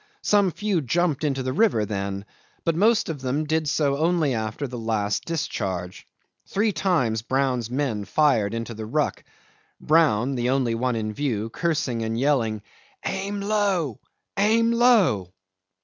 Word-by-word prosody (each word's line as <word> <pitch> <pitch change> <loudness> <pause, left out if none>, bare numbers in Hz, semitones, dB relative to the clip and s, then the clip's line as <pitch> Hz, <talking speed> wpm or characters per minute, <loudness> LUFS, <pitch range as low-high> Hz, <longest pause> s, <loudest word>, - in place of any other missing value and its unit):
Some 205 -2 +3
few 200 -1 -1
jumped 160 +2 0
into 135 -3 0
the 130 0 -2
river 165 - +2
then, 100 -1 -4 0.4
but 165 - +1
most 215 +5 +3
of 155 -5 -5
them 135 +4 -1
did 155 0 0
so 140 -1 +1
only 160 -3 +2
after 110 +5 -3
the 125 -1 -6
last 110 -2 -1
discharge. 95 - -4 0.4
Three 210 +2 +1
times 150 - +1
Brown's 130 -2 0
men 125 -6 -2
fired 115 -9 +2
into 115 0 -4
the 110 -1 -7
ruck, 150 +6 -1 0.6
Brown, 145 -6 +3
the 125 -1 -1
only 130 -3 +1
one 125 +1 0
in 110 -1 -3
view, 115 -4 -2
cursing 150 -8 -1
and 115 +1 -2
yelling, 115 -7 +1 0.4
"Aim 200 +1 -3
low! 200 - 0 0.4
aim 225 +3 +3
low!" 200 - +3
135 Hz, 150 wpm, -24 LUFS, 115-170 Hz, 0.6 s, Some